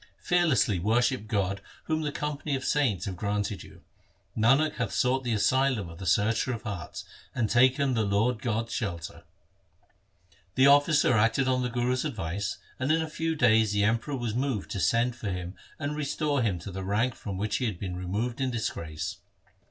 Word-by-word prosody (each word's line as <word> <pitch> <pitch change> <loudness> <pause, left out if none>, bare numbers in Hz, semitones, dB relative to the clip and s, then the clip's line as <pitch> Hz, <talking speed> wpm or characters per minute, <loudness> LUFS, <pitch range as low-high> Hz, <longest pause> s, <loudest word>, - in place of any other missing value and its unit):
Fearlessly 140 - +2
worship 115 +4 +1
God 100 -2 -1 0.2
Whom 160 0 -1
the 150 -1 -2
company 150 0 -3
of 130 - -4
saints 115 -12 +1
have 95 - -4
granted 100 +1 -2
you. - - -14 0.5
Nanak 135 +8 +3
hath - - -1
sought 130 +1 +1
the 120 - -2
asylum 130 -2 +2
of 85 - -11
the 95 - -5
Searcher 110 +6 +2
of 115 - -6
hearts, 100 -7 -6 0.3
And 120 -3 +1
taken 130 +4 +3
the 115 - +1
Lord 105 +3 +1
God's 115 0 -2
shelter. 85 -7 -3
1 - - -16 1.3
The 130 - +5
officer 145 0 +5
acted 115 +4 +3
on 130 -1 +2
the 125 - -1
Guru's 125 +1 0
advice, 100 - -3 0.2
and 130 +3 +1
in 160 0 +2
a - - -4
few 160 +1 -2
days 110 -6 +4
the 105 0 +2
Emperor 115 +6 0
was 120 -3 -3
moved 125 -4 -2
to 100 - -3
send 120 +5 +2
for 110 -3 -5
him 90 -1 -4 0.2
and 145 0 -3
restore 145 -1 0
him 105 -6 0
to 100 - -7
the 95 +1 -5
rank 110 +6 +1
from 100 -5 -6
which 105 +2 -1
he 125 - -1
had 105 -6 -2
been 90 -1 -5
removed 105 +8 -3
in 130 - +1
disgrace. 85 -6 -4
115 Hz, 190 wpm, -28 LUFS, 100-130 Hz, 1.3 s, The